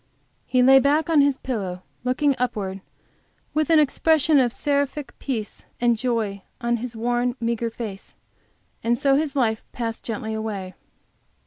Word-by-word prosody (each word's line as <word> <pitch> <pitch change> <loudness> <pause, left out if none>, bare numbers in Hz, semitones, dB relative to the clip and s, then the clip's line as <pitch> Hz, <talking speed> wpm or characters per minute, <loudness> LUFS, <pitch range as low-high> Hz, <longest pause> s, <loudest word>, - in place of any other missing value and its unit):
He 250 0 +3
lay 270 +1 +8
back 295 +4 +2
on 305 -3 +6
his 280 -1 +3
pillow 190 -9 -4 0.2
looking 265 +3 +2
upward 195 -6 -2 0.7
with 310 +1 +1
an 325 - +6
expression 305 0 +4
of 245 -2 +3
seraphic 285 -1 -1
peace 225 -7 -4
and 240 -1 +3
joy 220 -4 -1 0.2
on 235 -1 0
his 235 0 -6
worn, 240 +2 0
meagre 235 0 -1
face, 220 -4 -7 0.7
and 235 +1 +2
so 275 +2 +3
his 290 -1 0
life 225 -5 +1
passed 230 -2 -4
gently 220 -1 -4
away. 205 -4 -4
245 Hz, 145 wpm, -23 LUFS, 225-280 Hz, 0.7 s, lay